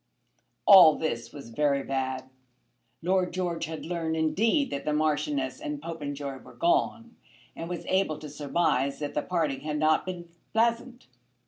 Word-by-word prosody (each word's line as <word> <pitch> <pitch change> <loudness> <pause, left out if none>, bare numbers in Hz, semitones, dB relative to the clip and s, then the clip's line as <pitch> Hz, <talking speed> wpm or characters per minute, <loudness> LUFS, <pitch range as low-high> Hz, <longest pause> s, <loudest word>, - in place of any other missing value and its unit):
All 180 -6 +9
this 120 -7 -3
was 140 -5 -10
very 140 +2 +1
bad. 130 -1 -3 0.8
Lord 185 +1 +1
George 175 -2 -2
had 160 0 -6
learned, 165 -1 -2
indeed, 220 - +2
that 140 - -3
the 150 - -1
Marchioness 150 -4 0
and 150 -1 -4
Popenjoy 145 -4 -5
were - - -15
gone, 275 -9 0 0.4
and 165 - -6
was 175 -1 -5
able 190 -5 +1
to 155 - -8
surmise 140 -2 0
that 145 -1 -4
the 150 - 0
parting 155 -5 -1
had 150 +1 -3
not 155 +3 +2
been 175 -2 -5 0.3
pleasant. 235 +2 0
155 Hz, 150 wpm, -28 LUFS, 145-180 Hz, 0.8 s, All